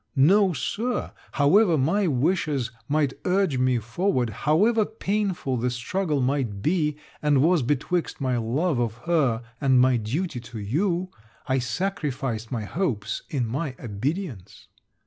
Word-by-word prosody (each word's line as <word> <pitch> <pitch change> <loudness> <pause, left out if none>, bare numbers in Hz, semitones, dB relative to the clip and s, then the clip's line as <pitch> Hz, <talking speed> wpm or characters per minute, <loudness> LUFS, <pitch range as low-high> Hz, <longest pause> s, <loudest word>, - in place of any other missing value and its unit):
No, 190 +8 +5
Sir; 235 - -2 0.2
however 165 +5 +4
my 180 +9 +2
wishes 145 -3 0 0.2
might 145 -2 +1
urge 185 -7 +1
me 130 -1 +3
forward, 120 - 0
however 205 - +2
painful 200 - -2
the 125 +2 0
struggle 145 +5 -1
might 125 -6 -1
be 150 -3 +1 0.2
and 145 -3 +3
was 170 0 +4
betwixt 145 +7 -1
my 130 -3 0
love 125 +6 0
of 115 -2 -1
her 135 -9 +2 0.2
and 130 -2 +4
my 130 0 +4
duty 130 - -2
to 120 0 -10
you, 170 - -1 0.3
I 130 -1 +1
sacrificed 130 - -3
my 115 -4 -2
hopes 115 - -2
in 130 -5 -1
my 130 +4 -3
obedience. 120 - -5
140 Hz, 135 wpm, -25 LUFS, 120-180 Hz, 0.3 s, No